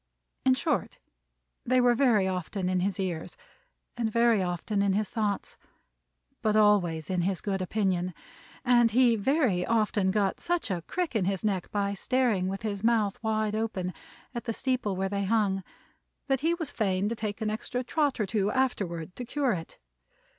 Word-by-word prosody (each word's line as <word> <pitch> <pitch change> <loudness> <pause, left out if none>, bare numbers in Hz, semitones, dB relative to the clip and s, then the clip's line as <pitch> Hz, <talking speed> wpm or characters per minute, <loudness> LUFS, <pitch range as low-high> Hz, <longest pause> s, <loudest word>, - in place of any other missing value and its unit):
In 260 -1 +5
short, 270 - -1 0.7
they 255 +1 +3
were 245 -1 +5
very 235 -6 +3
often 185 +1 -2
in 185 0 +1
his 190 +1 -1
ears, 175 -4 -3 0.6
and 230 -2 -1
very 230 -2 +4
often 180 +3 -1
in 200 -1 +2
his 210 +1 -1
thoughts, 210 -3 -2 0.8
but 215 -1 +1
always 195 -7 +3
in 185 -2 0
his 185 +1 0
good 195 -2 -2
opinion; 185 -2 -1 0.5
and 240 -2 +5
he 240 +1 +4
very 225 - +2
often 210 -2 +1
got 195 -1 +1
such 345 - -1
a 175 -2 -1
crick 355 -8 -2
in 205 -5 +2
his 195 -1 -1
neck 195 -4 -1
by 200 -1 -1
staring 230 -4 +1
with 195 +3 -4
his 205 -2 -3
mouth 220 -3 +2
wide 215 -1 0
open, 205 -5 -2 0.4
at 235 - -5
the 230 - -1
steeple 250 -6 -1
where 190 +1 -1
they 200 0 -2
hung, 195 -2 +1 0.6
that 270 -2 +1
he 330 +4 +1
was 330 -3 -4
fain 195 -2 0
to 230 - -2
take 215 -2 -4
an 215 -1 -1
extra 245 +3 -3
trot 285 0 0
or 210 - +2
two, 200 0 0
afterward, 190 -10 -1
to 250 - -5
cure 270 +1 0
it. 165 -5 -5
210 Hz, 175 wpm, -28 LUFS, 190-235 Hz, 0.8 s, In